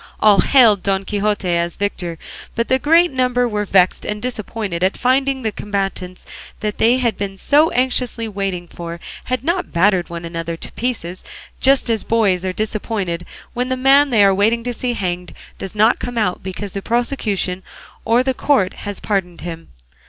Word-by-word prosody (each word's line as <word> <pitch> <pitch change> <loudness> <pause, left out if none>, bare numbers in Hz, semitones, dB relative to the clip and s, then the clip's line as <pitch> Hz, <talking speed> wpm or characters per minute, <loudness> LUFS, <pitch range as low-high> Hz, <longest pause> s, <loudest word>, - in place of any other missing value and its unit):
All 210 -2 +5
hailed 225 -7 +5
Don 195 0 0
Quixote 205 -1 -1
as 170 -1 +1
victor, 180 -4 -3 0.4
but 230 0 -1
the 260 - +3
greater 330 +5 +4
number 250 -1 +1
were 210 -2 -2
vexed 185 -2 +3
and 210 0 -3
disappointed 215 -6 -4
at 190 - +1
finding 265 +1 +1
that 220 -2 -2
the - - -6
combatants 195 -3 -3 0.3
they 220 +3 +2
had 235 -5 0
been 195 -1 -4
so 295 - +4
anxiously 250 -2 0
waiting 195 -4 -3
for 170 0 -7 0.3
had 255 0 -2
not 350 +4 -1
battered 180 0 +2
one 170 0 -6
another 165 0 -4
to - - -9
pieces, 205 -8 -4 0.4
just 270 0 +3
as 225 -3 +2
the - - -13
boys 200 -6 +2
are 185 - -1
disappointed 200 -4 -3 0.3
when 250 +1 -2
the 260 - -1
man 275 +2 +5
they 220 -5 +4
are 195 -1 +5
waiting 220 +4 +2
to 245 0 -3
see 245 +1 -2
hanged 180 -3 -3 0.2
does 195 +1 -6
not 215 +3 +4
come 245 -1 -5
out, 185 -5 0
because 190 +1 -6
the 195 - -4
prosecution 215 -6 -1 0.4
or 235 +3 +3
the 265 0 0
court 255 -8 +1
has 205 -2 -6
pardoned 185 -4 -2
him. 165 -1 -7
210 Hz, 180 wpm, -19 LUFS, 185-245 Hz, 0.4 s, All